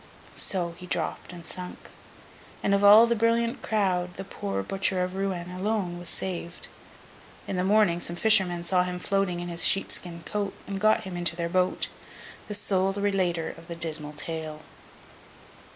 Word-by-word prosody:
So, 175 -3 -1
he 180 - -9
dropped 170 0 -3
and 175 -2 -10
sunk; 180 +1 -7 0.7
and 200 - +2
of 200 0 +2
all 210 +3 +9
the 235 0 +1
brilliant 230 +2 +1
crowd, 185 -4 0
the 195 - -5
poor 100 - -4
Butcher 190 - 0
of 180 0 -3
Rouen 190 -2 -3
alone 185 -2 -2
was 175 -1 -3
saved. 175 -2 -4 0.8
In - - -3
the 180 - 0
morning, 200 -3 +3
some 170 0 -2
fishermen 185 -4 +4
saw 180 +1 +2
him 180 0 -2
floating 185 -1 0
in 175 - -5
his 170 0 -2
sheep 195 - +3
skin 170 -2 -2
coat, 205 -2 -3
and 195 -1 -5
got 215 0 +4
him 185 -2 -6
into 175 -1 +1
their 170 -1 -2
boat—the 185 +3 -3
sole 195 -2 +1
relater 190 -5 0
of 165 0 -14
the 170 - -5
dismal 155 -3 -1
tale. 155 0 -3
180 Hz, 170 wpm, -27 LUFS, 170-195 Hz, 0.8 s, all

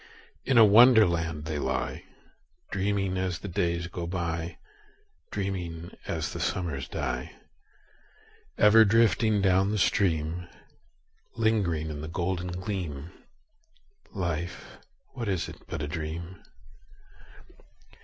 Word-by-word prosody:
In 130 -2 +2
a 115 - +9
Wonderland 100 -9 +5
they 75 -1 -3
lie, 65 -2 -2 0.7
Dreaming 95 -1 0
as 95 -2 -1
the - - -8
days 85 -1 -1
go 85 -1 -5
by, 85 -1 -3 0.7
Dreaming 90 -4 -4
as - - -2
the - - -5
summers 75 -7 -2
die: 60 +1 -4 1.2
Ever 105 +2 +7
drifting 110 -1 +3
down 95 +1 +3
the 105 - 0
stream— 90 -3 +1 0.9
Lingering 100 -9 +1
in 75 -1 -6
the 80 - -5
golden 85 +1 -2
gleam— 90 -5 -4 1.0
Life, 85 -2 -4 0.3
what 115 -5 -4
is 95 -4 -1
it - - -9
but 80 -2 -4
a - - -2
dream? 85 +3 -5
90 Hz, 110 wpm, -28 LUFS, 80-100 Hz, 1.2 s, a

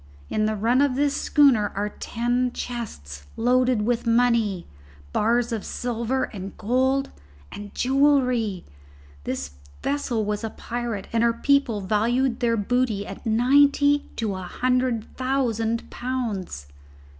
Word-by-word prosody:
In 215 - 0
the 215 0 0
run 235 +6 +2
of 285 -3 +2
this 285 +1 +1
schooner 260 -11 +3
are 205 +1 -1
ten 240 +3 -1
chests 75 - -6
loaded 250 -1 +2
with 240 +1 -1
money, 230 -6 +2 0.5
bars 235 +2 +1
of 225 -3 -2
silver 245 +2 -2
and 195 -2 -7
gold, 260 +5 +1 0.4
and 205 0 -8
jewellery. 255 -7 +2 0.6
This 65 +2 -3 0.3
vessel 255 -6 -1
was 210 +1 -2
a 225 - -2
pirate, 235 -3 -5
and 230 - +2
her 235 0 +3
people 245 -3 +1
valued 235 +6 +1
their 230 -2 +1
booty 220 -1 0
at 195 +3 -8
ninety 285 +5 +4
to 220 -4 -2
a 185 - -5
hundred 250 +3 0
thousand 235 -4 -1
pounds." 225 - -4
235 Hz, 130 wpm, -24 LUFS, 215-255 Hz, 0.6 s, ninety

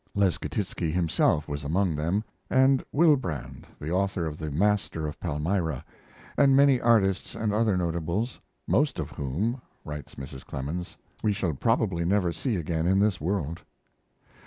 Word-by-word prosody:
Leschetizky 95 -3 0
himself 80 -2 +2
was 70 -1 -4
among 85 +3 +1
them, 85 +8 0 0.3
and 130 0 +4
Wilbrandt, 135 - +1
the 75 +2 -4
author 95 -1 0
of 80 -2 -3
the 80 -1 -3
Master 95 0 +1
of 75 - -6
Palmyra, 80 -2 -1 0.5
and 135 -1 +6
many 140 -2 +5
artists 100 -5 +2
and 105 -2 -1
other 105 -3 +2
notables, 85 +7 -1 0.3
"most 145 -2 +2
of 80 -5 -4
whom," 100 - -2 0.2
writes 75 -1 -7
Mrs. 65 0 -8
Clemens, 80 +7 -5 0.2
"we 105 - +2
shall 90 -5 -1
probably 100 - +1
never 90 0 +2
see 125 +3 -1
again 80 -1 -1
in 95 +1 +3
this 100 -4 +2
world." 85 -1 -2
90 Hz, 145 wpm, -27 LUFS, 80-105 Hz, 0.5 s, and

